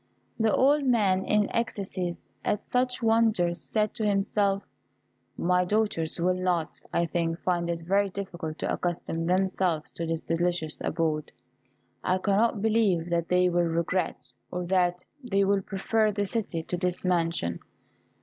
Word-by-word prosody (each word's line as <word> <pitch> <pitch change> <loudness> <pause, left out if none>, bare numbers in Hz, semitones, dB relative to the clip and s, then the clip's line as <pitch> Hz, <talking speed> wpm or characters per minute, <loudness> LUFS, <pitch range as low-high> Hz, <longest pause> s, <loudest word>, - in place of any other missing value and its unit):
The 220 -1 +3
old 285 +5 +4
man, 205 -7 +2
in 210 -1 +2
ecstasies 195 -6 -3 0.2
at 210 - -1
such 250 0 0
wonders, 220 -6 +2
said 215 -1 0
to 225 - -4
himself, 200 0 +1 0.7
"My 180 +1 +2
daughters 180 -5 0
will 180 +2 +2
not, 180 -3 -1
I 170 - +2
think, 165 0 -1
find 175 -2 0
it 165 -1 -3
very 195 +3 +2
difficult 175 -5 -5
to - - -1
accustom 165 -1 -2
themselves 185 -3 +1
to 165 - -4
this 165 0 -2
delicious 165 -2 -1
abode. 155 -2 -1 0.7
I 185 0 +2
cannot 205 +2 +1
believe 210 -7 +2
that 170 -1 0
they 180 0 +4
will 175 0 +2
regret, 170 -5 -1 0.2
or 180 +3 -3
that 180 -1 +1 0.2
they 200 -5 +2
will 200 0 +2
prefer 215 +3 +1
the 205 0 -1
city 190 -5 -2
to 180 - -3
this 180 +1 -2
mansion. 165 - 0
180 Hz, 150 wpm, -27 LUFS, 170-205 Hz, 0.7 s, old